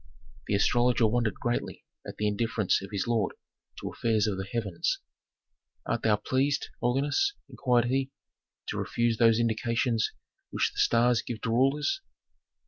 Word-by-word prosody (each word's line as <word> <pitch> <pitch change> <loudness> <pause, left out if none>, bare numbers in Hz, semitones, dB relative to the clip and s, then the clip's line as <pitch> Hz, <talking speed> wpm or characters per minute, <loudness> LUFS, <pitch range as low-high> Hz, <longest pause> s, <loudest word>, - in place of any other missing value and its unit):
The 100 - +1
astrologer 120 +3 +3
wondered 115 0 +1
greatly 120 0 -3 0.2
at - - -8
the 105 - 0
indifference 105 -1 +1
of 95 - -8
his 100 -3 -1
lord 115 -5 0 0.4
to - - -5
affairs 110 -2 +1
of 105 -3 0
the 95 - -4
heavens. 100 -8 -1 0.9
"Art 120 - -1
thou 110 -2 +3
pleased, 135 +6 0
holiness," 140 - +1
inquired 120 -2 +1
he, 135 +2 0 0.6
"to - - -3
refuse 120 -1 0
those 115 -1 +5
indications 115 0 +1 0.4
which - - 0
the - - -7
stars 120 0 +3
give 115 -2 -6
to 115 - -2
rulers?" 140 - +2
115 Hz, 145 wpm, -28 LUFS, 110-125 Hz, 0.9 s, those